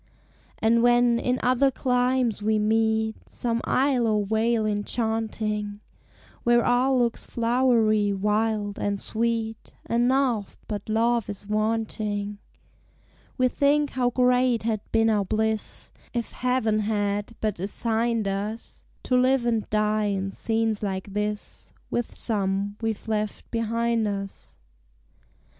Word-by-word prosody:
And 230 +1 +3
when, 240 0 +4
in 250 +1 0
other 255 +2 +4
climes, 250 -3 +1
we 215 +1 +2
meet 220 0 +1
Some 235 -1 -2
isle 260 -3 +2
or 210 -2 +1
vale 220 +1 +1
enchanting, 215 -1 -2 0.6
Where 240 0 +3
all 255 +2 +3
looks 240 -2 0
flowery, 230 -3 +2
wild, 210 +1 0
and 200 -1 -1
sweet, 225 0 -2
And 235 +1 +1
naught 255 -6 +1
but 210 -1 -5
love 230 0 +1
is 205 0 -7
wanting; 210 -1 -2 1.0
We 255 -1 +4
think 285 +3 +2
how 250 -1 +1
great 250 -1 +2
had 220 -2 -1
been 225 0 +3
our 210 -2 +2
bliss 220 +2 -2 0.2
If 235 -1 -2
Heaven 250 -4 0
had 205 0 -1
but 215 -5 -2
assigned 225 +3 0
us 205 +3 -4 0.2
To 255 - +1
live 255 0 +3
and 230 -3 0
die 215 0 +1
in 195 -1 -1
scenes 225 0 -1
like 195 -1 -4
this, 210 0 -4 0.2
With 240 - -2
some 200 -2 -1
we've 225 -1 -3
left 215 -1 -3
behind 230 0 0
us! 195 - -6
220 Hz, 125 wpm, -25 LUFS, 210-240 Hz, 1.0 s, when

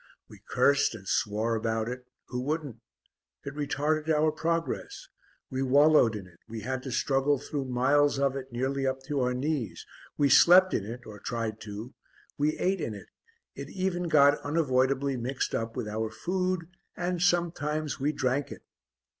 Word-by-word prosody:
We - - -15
cursed 140 -4 +3
and 100 -3 -11
swore 110 +4 0
about 110 0 -1
it; 125 +1 -6 0.2
who 125 0 -3
wouldn't? 145 -3 -3 0.7
It 140 - -6
retarded 150 +2 -1
our 155 0 +3
progress; 170 - -3 0.4
we 130 0 -2
wallowed 140 -3 +5
in 100 -3 -6
it, 85 -2 -19
we 110 0 -6
had 130 +3 -3
to 130 - -6
struggle 135 +3 +2
through 140 +1 -4
miles 135 +3 +2
of 135 -1 +1
it 135 -1 -6
nearly 135 +3 -1
up 130 0 -2
to 145 0 -2
our 125 -1 +1
knees; 125 - -2 0.3
we 145 - +4
slept 185 +7 +7
in 100 - 0
it 120 +2 -7
or 105 -2 -10
tried 115 -2 -4
to; 105 +4 -7 0.4
we 150 +2 0
ate 190 -1 0
in 110 - -3
it, 100 -3 -12 0.4
it 140 0 -8
even 185 -1 -2
got 145 -1 +5
unavoidably 140 -3 +1
mixed 125 +3 -2
up 115 0 -2
with 105 - -3
our 110 +1 -2
food; 180 +2 -2 0.3
and 175 -1 -2
sometimes 160 -4 0
we 145 +3 +1
drank 140 -1 -1
it. - - -9
140 Hz, 170 wpm, -28 LUFS, 120-155 Hz, 0.7 s, slept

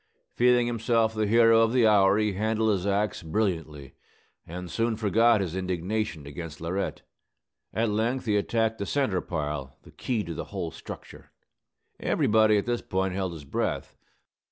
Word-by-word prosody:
Feeling 125 0 +4
himself 115 -1 +1
the 110 -1 0
hero 115 +1 +5
of 115 +1 +2
the 125 -3 +4
hour, 100 -2 +5
he 105 -1 +1
handled 110 +2 +1
his 100 -1 -1
axe 100 +2 0
brilliantly, 80 -6 -2 0.5
and 90 +1 -7
soon 115 0 0
forgot 115 +1 +3
his 90 -2 -3
indignation 95 -2 -2
against 75 +1 -8
Laurette. 90 +4 -3 0.7
At 110 +1 0
length 115 +5 -1
he 105 -2 +1
attacked 110 +2 0
the 100 - -3
centre 130 -11 0
pile, 75 -5 -4
the - - -15
key 115 -5 -2
to 85 - -6
the - - -5
whole - - -5
structure. - - -11 0.7
Everybody, 110 0 +3
at 100 - -1
this 120 -1 -1
point, 95 0 -1
held 95 -2 -2
his 75 -4 -10
breath. - - -3
105 Hz, 160 wpm, -27 LUFS, 90-115 Hz, 0.7 s, hero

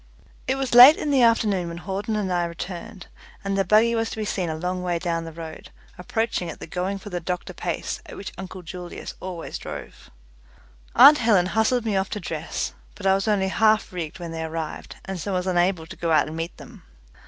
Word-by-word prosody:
It 265 - +1
was 270 -2 -2
late 250 +5 +11
in 295 - -2
the 270 -2 +4
afternoon 215 -6 +3
when 170 0 -6
Hawden 195 +4 -3
and 195 -3 -1
I 175 -1 +1
returned, 180 +4 -7 0.4
and 195 0 -1
the 195 - +2
buggy 215 +5 +4
was 225 -1 0
to - - -7
be 215 - -2
seen 185 -4 -2
a 160 - -2
long 180 +3 -3
way 175 -1 0
down 165 -1 -2
the 165 - -7
road, 160 0 -9 0.3
approaching 200 -1 -2
at - - -8
the - - -7
going 185 +4 -2
for 195 +1 -10
the 175 - -2
doctor 180 +1 -4
pace - - -3
at - - -9
which 195 - -7
uncle 185 -1 -8
Julius 175 +1 -7
always 180 -3 -6
drove. - - -9 0.9
Aunt 285 +4 +9
Helen 210 -6 +4
hustled 220 +5 +1
me 215 -3 0
off 190 0 0
to 210 - -4
dress, 160 -3 -4 0.2
but 205 - -9
I 190 - +5
was 195 +2 0
only 195 -3 +2
half 215 0 +2
rigged 165 -4 -5
when 170 -2 -7
they 165 0 -4
arrived, 160 -1 -5
and 190 -1 -5
so 195 +4 -3
was 180 0 -1
unable 175 -2 +1
to - - -10
go 170 -1 -2
out 155 - +4
and 155 - -7
meet 165 +2 -5
them. - - -13
185 Hz, 220 wpm, -24 LUFS, 170-215 Hz, 0.9 s, late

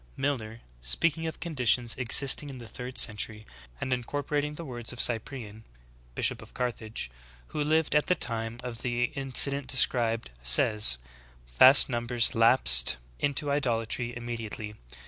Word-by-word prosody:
Milner, 115 -5 -4 0.2
spea 105 - 0
ing 165 0 -6
of 160 - -8
conditions 125 - +2
existing 135 +4 +3
in 135 - -10
the 120 -2 -11
third 125 +2 -9
century, 105 0 +2 0.3
and 130 - -3
incorpor 140 +4 -5
ating 150 +1 -2
the 170 - -9
words 120 -4 -6
of 125 - -10
Cyprian, 110 -2 -1 0.5
bishop - - 0
of - - -16
Carthage, 115 - -4 0.4
v/ho - - -6
lived 155 0 -1
at 150 - +1
the 180 - +1
time 115 -3 -3
of 120 -2 -8
the 120 -1 -3
incident 140 0 +1
described, 115 - +1
says: 60 - +4 0.6
"Vast 130 +2 +7
numbers 120 -1 -1
lapsed 115 - +5 0.2
into 145 0 -2
idolatry 120 -3 -3
immediately. 115 -3 -8
120 Hz, 145 wpm, -26 LUFS, 115-140 Hz, 0.6 s, Vast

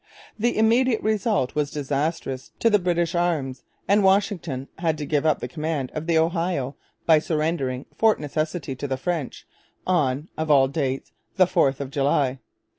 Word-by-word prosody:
The 240 +3 +1
immediate 230 +2 +3
result 215 - +1
was 150 -1 0
disastrous 145 -1 -2
to 230 - +3
the 210 - +5
British 175 -1 0
arms; 160 -7 -1 0.3
and 205 +1 +4
Washington 190 -9 +1
had 160 -3 0
to 150 - -4
give 150 +1 +1
up 155 - +2
the - - -3
command 155 -5 -3
of 155 +1 -5
the 165 -1 +3
Ohio 165 -5 0 0.3
by 160 -2 +6
surrendering 150 -5 -1
Fort 220 -1 +3
Necessity 155 0 -3
to 145 - -4
the 135 -1 -2
French 155 -1 -3 0.4
on 150 -5 +1
of 160 0 -2
all 135 -3 +6
dates 135 -2 -2 0.2
the 185 - +5
4th 135 -6 +2
of 140 -1 -5
July! 135 -2 +1
155 Hz, 165 wpm, -24 LUFS, 140-175 Hz, 0.4 s, by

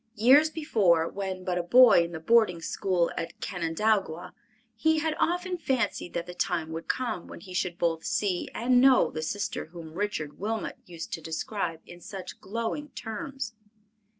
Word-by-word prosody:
Years 275 +8 +6
before, 205 - +2
when 190 -1 -4
but 180 -1 -1
a - - +2
boy 235 0 +7
in 170 - -5
the 160 - -5
boarding 215 -1 +3
school 175 0 0
at 165 - -5
Canandaigua, 180 0 -1 0.4
he 320 +8 +2
had 315 0 0
often 355 +1 0
fancied 245 - -1
that 170 0 -2
the 180 - -8
time 175 -3 -1
would 165 +1 -6
come 245 -8 -2
when - - -10
he 185 +1 -10
should 180 -1 -1
both 165 -2 0
see 210 -4 -1
and 245 +1 +3
know 265 -1 +5
the 155 - -4
sister 200 +6 -3
whom 160 -1 -10
Richard 170 -6 -3
Wilmot 220 +2 -3
used 170 -2 -7
to 165 - -3
describe 165 +1 -3
in 175 0 -12
such 185 0 -8
glowing 230 +8 -3
terms. 240 +2 -5
190 Hz, 170 wpm, -28 LUFS, 170-235 Hz, 0.4 s, boy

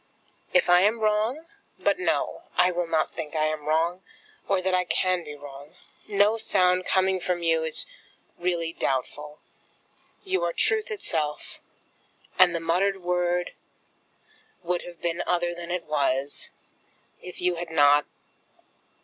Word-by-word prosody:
If 270 - +3
I 175 0 +6
am 215 +4 +2
wrong? 220 +8 0 0.3
But - - +1
no; 370 - -1 0.2
I 180 - +5
will 175 -1 -2
not 160 -1 0
think 160 -2 -6
I 155 0 +2
am 155 -1 -3
wrong, 165 +4 +1 0.5
or 195 -1 +2
that 185 0 -1
I 180 0 +3
can 180 +1 0
be 150 -2 -8
wrong. 145 0 -12 0.3
No 205 +1 +3
sound 185 -3 +2
coming 190 0 +2
from 180 -1 -2
you 165 -1 +2
is 160 -1 +1 0.5
really 170 -2 -1
doubtful. 150 +3 -3 0.9
You 380 -1 -1
are - - 0
truth 440 -1 +1
itself, 155 - -3 0.8
and 180 -2 +6
the - - 0
muttered 185 +3 0
word 180 0 0 1.1
would 175 0 -1
have 175 -1 -12
been 170 0 -1
other 175 -1 0
than 175 0 -8
it 180 0 -2
was, 140 -2 -1 0.7
if 180 - -10
you 180 -1 0
had 170 0 -5
not 145 -2 +4
175 Hz, 145 wpm, -26 LUFS, 160-185 Hz, 1.1 s, I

